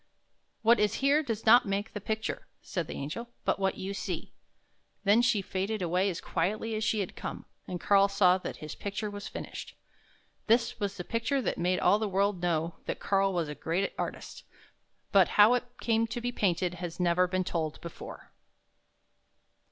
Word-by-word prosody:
" - - -46
What 230 +2 +5
is 210 0 +2
here 280 +3 +3
does 225 -7 -4
not 240 +1 +7
make 200 +2 -2
the 205 - -5
picture," 220 +2 -3 0.2
said 170 -4 -3
the - - -6
Angel, 155 +13 -5
" - - -42
but - - +1
what 195 -1 0
you 195 +1 -4
see." - - -4 0.7
Then 210 +3 +5
she 215 -5 +2
faded 195 +2 -2
away 180 +3 +1
as 175 - -4
quietly 210 +6 -1
as 215 0 -1
she 215 -1 +1
had 190 - -5
come, - - -6 0.2
and 180 - -4
Karl 200 +1 +5
saw 190 -2 +4
that - - -6
his 155 - -6
picture 205 +1 -4
was 205 +1 -6
finished. - - -7 0.7
This 235 +1 +2
was 200 -1 -2
the 180 - -4
picture 230 +8 0
that - - -1
made 180 +1 +1
all 205 - +4
the 215 -1 -1
world 195 -1 +1
know 170 -1 0
that - - -3
Karl 195 0 +2
was 170 -4 -1
a 150 - -4
great 170 +6 -1
artist; - - -5 0.7
but 195 -3 +6
how 210 +3 +8
it 250 - +1
came 230 -1 +1
to 235 - -4
be 245 +1 -2
painted 180 -5 0
has 175 -1 -5
never 180 +1 +3
been 185 0 0
told 160 -3 -2
before. 170 - -9
200 Hz, 190 wpm, -30 LUFS, 180-220 Hz, 0.7 s, how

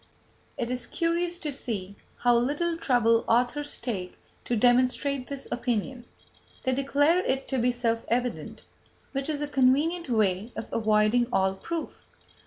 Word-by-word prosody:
It 240 0 -2
is 250 0 -3
curious 340 +1 -1
to 300 -3 -3
see 200 -7 -4 0.3
how 245 -1 +4
little 295 +8 +1
trouble 235 -7 +3
authors 250 +5 +1
take 190 -7 -4 0.3
to 240 - 0
demonstrate 255 +3 +2
this 280 -1 -6
opinion; 245 +1 -2 0.6
they 260 - +1
declare 285 +5 +3
it 270 +1 -1
to 265 - 0
be 245 +1 +3
self 230 -2 -1
evident, 245 +1 -2 0.5
which 275 +2 -3
is 295 -1 -1
a - - -2
convenient 290 +5 +2
way 215 -1 +1
of - - -4
avoiding 215 +2 +3
all 190 -3 +2
proof. 330 +12 -6
250 Hz, 145 wpm, -27 LUFS, 230-285 Hz, 0.6 s, how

